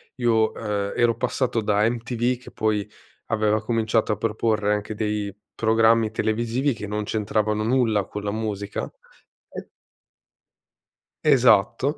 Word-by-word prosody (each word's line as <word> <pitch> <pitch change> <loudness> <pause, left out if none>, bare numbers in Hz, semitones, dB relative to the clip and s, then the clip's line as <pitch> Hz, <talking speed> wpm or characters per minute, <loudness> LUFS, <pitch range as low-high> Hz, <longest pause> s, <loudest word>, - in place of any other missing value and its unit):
io, 115 -3 +1
ehm, 105 -2 -3
ero 120 -1 +3
passato 125 -1 -1
da 105 +1 +2
MTV 120 +1 -1
che - - -12
poi 105 -2 -1 0.4
aveva 110 -1 +1
cominciato 110 -1 0
a - - -5
proporre 105 -1 0
anche 105 +1 -3
dei 105 -2 -2 0.2
programmi 115 0 +3
televisivi 120 +5 0
che 105 -2 -7
non 105 0 -2
c'entravano 105 0 -1
nulla 115 -5 +2
con 105 0 -7
la 100 - -2
musica. 105 -2 -4 0.6
E - - -8 1.6
Esatto, 130 - +4
110 Hz, 125 wpm, -23 LUFS, 105-115 Hz, 1.6 s, Esatto